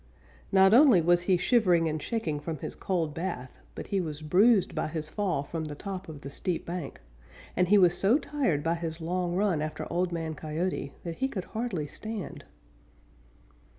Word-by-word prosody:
Not 190 +1 +6
only 255 - +7
was 175 +1 +3
he 185 - +5
shivering 180 -5 +3
and 155 -1 -2
shaking 170 -10 -2
from 160 +1 -4
his - - -6
cold 165 -5 -2
bath, 165 -7 -5 0.2
but - - -6
he 195 -1 0
was 155 -2 -5
bruised 195 +6 +4
by - - -1
his 155 -1 -5
fall 190 -9 -1
from 160 +2 -4
the 150 -1 -6
top 190 +1 -6
of 150 -3 -9
the 140 - -8
steep 175 +3 -2
bank, 170 -4 -5 0.6
and 180 0 +2
he 205 +3 +6
was 180 -3 +5
so 210 +7 +3
tired 275 - -1
by 165 - +1
his 165 -1 -4
long 175 +1 -1
run 190 -5 +1
after 155 0 -4
Old 180 +1 0
Man 165 -2 -3
Coyote 155 0 -3
that 170 -2 -5
he 265 - +1
could 195 -9 -4
hardly 220 -9 -2
stand. 215 +7 -7
175 Hz, 185 wpm, -28 LUFS, 155-195 Hz, 0.6 s, only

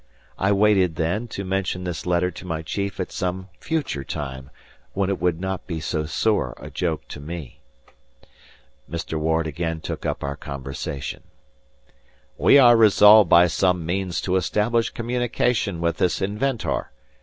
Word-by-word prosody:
I 95 +2 +2
waited, 100 -4 +3
then, 85 +9 -1
to 100 -3 -6
mention 95 -1 -2
this 90 -1 -5
letter 90 +1 +1
to - - -10
my 80 -2 -3
chief 100 +5 -4
at 95 - -3
some 95 0 -3
future 145 - -2
time, 65 -1 -6 0.4
when 100 0 0
it 95 - -3
would 90 -2 +1
be - - -11
not 95 -1 -3 0.2
so 75 0 -2
sore 105 +6 0
a - - -10
joke 85 -3 -2
to - - -8
me. 75 -2 -8 1.3
Mr. 80 -1 -4
Ward 80 +1 +1
again 80 +1 -3
took - - -6
up - - -3
our 70 0 -3
conversation. 70 +1 -6 1.1
"We - - +5
are 120 -3 +8
resolved 105 -1 +7
by 85 +1 +7
some 90 -1 +1
means 90 -1 -2
to 95 0 +1
establish 110 +5 +1
communication 120 -5 -1
with 85 -1 0
this 90 - +1
inventor. 105 +6 -2
90 Hz, 155 wpm, -23 LUFS, 80-100 Hz, 1.3 s, are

